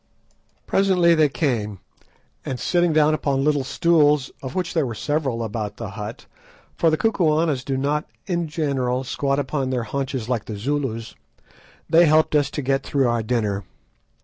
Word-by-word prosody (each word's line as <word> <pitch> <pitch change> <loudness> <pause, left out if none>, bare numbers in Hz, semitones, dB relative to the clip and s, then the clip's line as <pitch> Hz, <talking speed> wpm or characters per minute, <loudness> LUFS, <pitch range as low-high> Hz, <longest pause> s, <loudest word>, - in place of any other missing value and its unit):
Presently 185 -3 +3
they 155 -3 +4
came, 120 -7 -1 0.7
and 130 -2 -4
sitting 175 +3 +2
down 155 0 +4
upon 140 -3 0
little 145 -2 +2
stools, 150 -2 +2
of 130 -1 -7
which 180 -2 -2
there 160 - +2
were 120 - -5
several 135 -1 -1
about 110 -1 -4
the 115 -5 -6
hut, 105 +3 -7 0.5
for 165 - +3
the 155 - +1
Kukuanas 160 - +1
do 135 -1 -2
not 145 +3 0 0.2
in 170 -4 -1
general 135 -5 -1
squat 140 +2 -1
upon 135 -1 -1
their 125 -2 -1
haunches 130 0 -3
like 120 -4 -1
the 110 - -6
Zulus, 115 -2 -3 0.7
they 165 +1 +5
helped 155 +1 +3
us 145 -2 +3
to 145 - -4
get 135 +1 +1
through 135 -2 +1
our 120 -1 +1
dinner. 105 -3 -1
140 Hz, 165 wpm, -22 LUFS, 125-155 Hz, 0.7 s, they